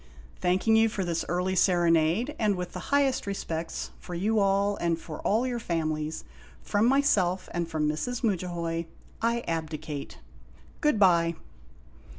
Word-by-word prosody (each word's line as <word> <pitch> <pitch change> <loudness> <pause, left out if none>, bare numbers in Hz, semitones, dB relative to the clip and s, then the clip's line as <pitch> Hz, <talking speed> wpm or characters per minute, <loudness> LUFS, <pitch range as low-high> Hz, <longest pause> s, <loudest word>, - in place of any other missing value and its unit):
Thank 180 +4 +1
ing 220 - +6
you 225 0 +5
for 200 -3 -3
this 170 -1 -1
early 180 +2 0
serenade, 175 - +3
and 210 -2 +2
with 180 -1 -5
the - - -5
highest 280 -5 +2
respects 165 -4 -4
for 175 - -7
you 210 +5 +1
all 200 +1 +2
and 170 -1 0
for 160 -2 -8
all 225 +5 +1
your 245 -2 -2
families, 155 -5 -2 0.4
from 205 +2 +2
myself 215 -10 +2
and 170 -1 -1
from 155 -2 0
Mrs. 230 +12 -2
Mudja 190 -5 0
hoy, 170 -1 -3 0.3
I 235 +1 +1
abdicate. 155 - -4 0.6
Good 300 -6 +2
by! 170 -4 +4
180 Hz, 155 wpm, -28 LUFS, 165-220 Hz, 0.6 s, ing